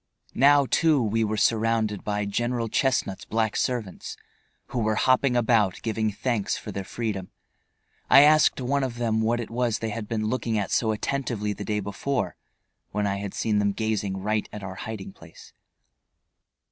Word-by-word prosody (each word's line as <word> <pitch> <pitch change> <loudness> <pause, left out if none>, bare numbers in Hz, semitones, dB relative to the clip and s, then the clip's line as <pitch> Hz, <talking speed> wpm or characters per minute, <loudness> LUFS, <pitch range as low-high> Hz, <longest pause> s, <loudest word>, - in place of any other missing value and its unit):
Now, 140 +2 +5
too, 160 0 +3
we 115 -1 +1
were 110 0 -1
surrounded 110 -1 +1
by 105 -1 -1
General 120 +3 -1
Chestnut's 120 -6 0
black 110 -1 -1
servants, 115 -8 -3 0.5
who 125 - -2
were 110 -1 +1
hopping 130 +2 +3
about, 110 -5 +2
giving 110 -1 0
thanks 110 0 -1
for - - -7
their 100 - -4
freedom. 100 -3 -4 0.8
I 135 - +9
asked 155 0 +5
one 135 +2 0
of 125 -3 -3
them 110 -2 0
what 115 +2 +1
it 115 - -6
was 120 -2 0
they 110 -1 -3
had 105 0 -5
been 110 -1 -2
looking 115 -1 -1
at 100 - -2
so 110 -2 +2
attentively 110 -2 -2
the 100 0 -7
day 105 -1 -1
before, 120 +7 -2 0.5
when 105 0 -1
I 100 -1 0
had 100 -1 -6
seen 105 -2 +1
them 100 -1 +1
gazing 105 -3 -2
right 105 +2 -1
at 105 - -8
our 95 -1 -5
hiding 100 0 -7
place. 80 0 -15
110 Hz, 170 wpm, -25 LUFS, 105-120 Hz, 0.8 s, I